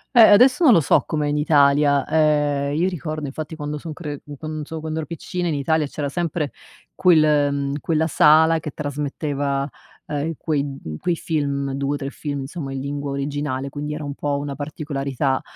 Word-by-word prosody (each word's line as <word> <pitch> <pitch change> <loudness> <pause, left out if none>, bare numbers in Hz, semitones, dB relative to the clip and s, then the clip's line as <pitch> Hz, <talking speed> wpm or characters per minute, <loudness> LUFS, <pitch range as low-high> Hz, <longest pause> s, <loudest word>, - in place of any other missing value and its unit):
Eh, 235 - +9
adesso 250 - +7
non 265 -8 +8
lo - - +6
so 145 - +3
com'è 150 -1 -1
in 145 0 0
Italia, 145 -2 +4
ehm, 145 -2 +2
io 175 +4 +2
ricordo 155 -4 -4
infatti 155 +3 -6
quando 150 -1 -4
son 160 +1 -7
cre 150 -4 -6
q 145 -1 -10
quando 155 0 -5
so 160 +2 -6
quando 155 0 -4
ero 155 - -5
piccina 175 +2 -4
in 160 - 0
Italia 150 +2 +1
c'era 145 0 -4
sempre 155 -1 -2 0.4
quel, 155 -5 +4
mhmm, 140 0 -2
quella 160 -1 +1
sala 160 +1 +5
che 150 - -6
trasmetteva, 145 -1 -2 0.4
ehm, 145 -1 -2
in 165 - -2
quei 140 -3 -2 0.2
quei 175 - 0
film 140 -4 -2
2 140 +1 -1
o - - -3
3 140 -1 -5
film 145 -2 -4
insomma 135 0 -6
in 135 - -4
lingua 140 +1 -4
originale 140 -1 -3
quindi 150 +2 -5
era 150 - -6
un 145 -1 -4
po' 145 0 -2
una 145 0 -4
particolarità, 140 -2 -2
145 Hz, 195 wpm, -22 LUFS, 140-155 Hz, 0.4 s, Eh